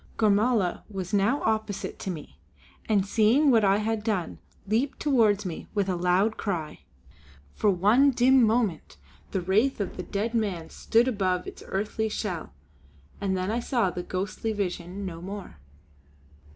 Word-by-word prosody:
Gormala 215 -2 +2
was 195 -1 -5
now 205 +8 +2
opposite 220 -2 -2
to - - -5
me, 150 - -7 0.5
and 200 -3 +3
seeing 235 +8 +4
what 225 -3 +4
I 195 0 +4
had 215 0 -1
done 210 -6 -2 0.3
leaped 230 +7 0
towards 220 -8 +3
me 175 -3 -5
with 200 -2 +1
a 185 - 0
loud 180 +5 +2
cry. 170 -7 -3 0.7
For 210 - +1
one 210 +9 +4
dim 260 +1 +4
moment 220 - 0 0.3
the 190 - -2
wraith 215 +10 +2
of 200 - -4
the 180 - -4
dead 215 +5 -3
man 195 -8 -2
stood 230 +3 +2
above 185 -6 0
its - - -9
earthly 215 +3 -2
shell; 185 - -4 0.7
and 190 -2 0
then 185 +2 -1
I 235 - 0
saw 235 -6 0
the 180 - -4
ghostly 195 +5 -3
vision 185 -1 -4
no 170 -3 -6
more. 190 - -8
205 Hz, 155 wpm, -27 LUFS, 185-225 Hz, 0.7 s, seeing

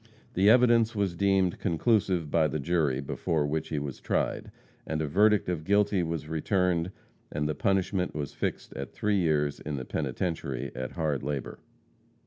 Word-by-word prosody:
The 95 +3 +4
evidence 115 -1 +5
was 100 -4 0
deemed 95 -1 +2
conclusive 95 -3 +1
by 80 -2 +3
the 75 - -2
jury 75 -4 +1
before 75 +2 -1
which 75 +2 -2
he 75 - -2
was 70 -2 -4
tried, - - -1 0.3
and 80 - -3
a 80 - 0
verdict 105 +7 +3
of 85 -4 -2
guilty 100 +1 +2
was 80 -2 -3
returned 85 +2 +1 0.4
and 75 0 -1
the 75 - 0
punishment 95 +2 0
was 75 -3 -4
fixed - - -3
at 70 -1 -6
three 105 -2 +1
years 75 -4 +1
in 75 -1 -4
the 65 -2 -5
penitentiary 70 -2 -3
at 65 +1 -5
hard 75 -5 -1
labor. 70 -1 -4
80 Hz, 165 wpm, -28 LUFS, 75-95 Hz, 0.4 s, evidence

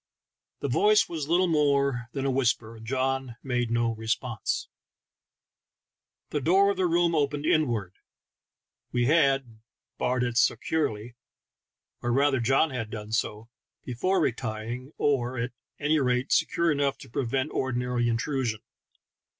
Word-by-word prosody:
The - - -1
voice 420 +1 +4
was 155 -4 -4
little 175 +3 +3
more 140 -6 +1
than 135 -1 -2
a 135 - +2
whisper, 120 -3 0
and 110 - -12
John 130 -1 -1
made 125 -3 -1
no 115 0 +1
responfse. 110 +1 -2 1.7
The 150 - -1
door 195 +7 +4
of 200 - -4
the 185 -1 +2
room 170 0 +2
opened 145 -1 0
inward; 120 - +1 1.0
we 120 -1 +1
had 135 -6 +2 0.4
barred 125 0 +1
it 120 -1 -1
securely 120 -5 0 0.4
— - - -60
or 120 - -1
rather 135 +1 +3
John 135 +6 +2
had 120 -4 -4
done 105 -1 -7
so 110 0 -2 0.2
— - - -63
before 185 +10 0
retiring, 120 -1 -3
or, 130 -3 0
at 120 +2 -2 0.3
any 150 +1 +2
rate, 125 0 0
secure 170 -1 +2
enough 140 -2 0
to - - -12
prevent 130 +4 -2
ordinary 125 -2 0
intrusion. 120 -1 -1
130 Hz, 140 wpm, -27 LUFS, 120-145 Hz, 1.7 s, voice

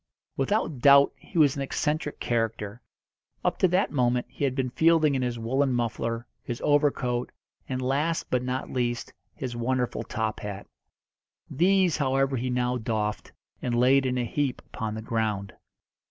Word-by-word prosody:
Without 155 - 0
doubt 140 +2 +7
he - - -10
was 145 -3 +5
an 140 - -3
eccentric 150 +2 -2
character. 115 -1 -2 0.6
Up - - +1
to 185 - +5
that 180 +3 +1
moment 125 -3 +1
he - - -6
had 130 -2 -1
been 130 -2 -1
fielding 160 0 +4
in 130 - 0
his 120 -1 -1
woollen 130 +4 +1
muffler, 115 0 -2 0.2
his 120 0 -5
overcoat, 135 -4 +1 0.4
and, 130 -1 -2
last 145 +6 0
but 125 - +2
not 130 +1 -3
least, 120 -2 -2 0.2
his 125 -3 -5
wonderful 125 +1 -1
top 110 -1 -3
hat. 100 -1 -6 0.9
These, 185 +2 +3
however, 135 -1 +1
he 125 +2 -2
now 125 0 0
doffed, 110 -2 -2 0.3
and 120 -1 -1
laid 130 +2 +4
in 125 0 -1
a 125 - 0
heap 135 +2 -1
upon 110 -1 -3
the 110 - -6
ground. 110 -4 -2
125 Hz, 160 wpm, -27 LUFS, 120-140 Hz, 0.9 s, doubt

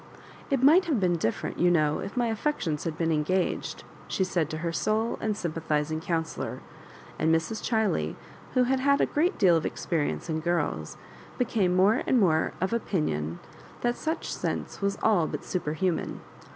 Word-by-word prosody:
*'It 270 -2 +1
might 330 +7 +7
have 300 -9 +1
been 180 -2 +2
different, 115 -9 -2
you 175 - +5
know, 155 -3 +2
if - - -6
mv 240 -2 +1
affections 205 - -1
had 160 -2 -3
been 165 -1 +1
engaged/* 165 +4 -1 0.2
she 190 - 0
said 175 -4 0
to 155 - -4
her' 170 - 0
sole 215 +6 0
and 215 -2 -1
sympathizing 155 -2 -1
counsellor; 165 -1 -3 0.6
and 160 - +2
Mrs. 165 +7 0
Cbiley, 220 -3 0 0.4
who 255 - +5
had 260 +2 +1
had 280 +1 +3
a - - +4
great 340 +6 +1
deal 185 -6 +5
of 160 - +1
experience 160 -4 -2
in 160 -1 -1
girls, 150 - -1 0.4
became 210 -7 +1
more 200 +6 +4
and 255 - +4
more 160 -6 +3
of 190 +5 -1
opinion 85 - -1 0.4
that 240 0 +1
such 320 +5 -3
sense - - -4
was 200 0 0
all 195 -8 +4
but 150 +2 -5
superhuman. 175 0 -2
180 Hz, 170 wpm, -27 LUFS, 160-225 Hz, 0.6 s, might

